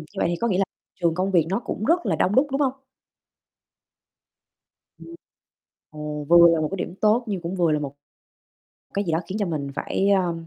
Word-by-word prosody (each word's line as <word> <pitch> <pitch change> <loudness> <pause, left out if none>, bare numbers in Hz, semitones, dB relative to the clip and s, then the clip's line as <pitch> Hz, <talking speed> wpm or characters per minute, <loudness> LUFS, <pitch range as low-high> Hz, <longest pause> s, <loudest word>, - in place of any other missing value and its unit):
như - - -10
vậy - - +1
thì 175 - -1
có 235 - +1
nghĩa 185 -4 +1
là 195 - +3 0.4
trường 170 -2 +2
công 185 +2 -1
việc 170 -5 +3
nó 195 - 0
cũng 215 - -4
rất 345 +5 +2
là - - +1
đông 195 - +1
đúc, 265 +3 +4
đúng 275 +2 -1
hông? 270 -3 +2 2.3
Ừm. 335 - -12 0.8
Ồ, 150 -1 -6
vừa 170 0 +8
là 160 - +1
một 155 - 0
cái 195 - -3
điểm 180 - -5
tốt 220 +3 +3
nhưng 195 -4 -3
cũng 170 +2 -4
vừa 170 -3 +2
là 150 - +1
một 140 -1 -6 1.0
cái 200 - 0
gì 170 - -2
đó 160 - +1
khiến 195 +4 -4
cho 205 - 0
mình 150 -5 -3
phải, 195 - -1
ờm, 175 -4 0
180 Hz, 220 wpm, -24 LUFS, 165-205 Hz, 2.3 s, vừa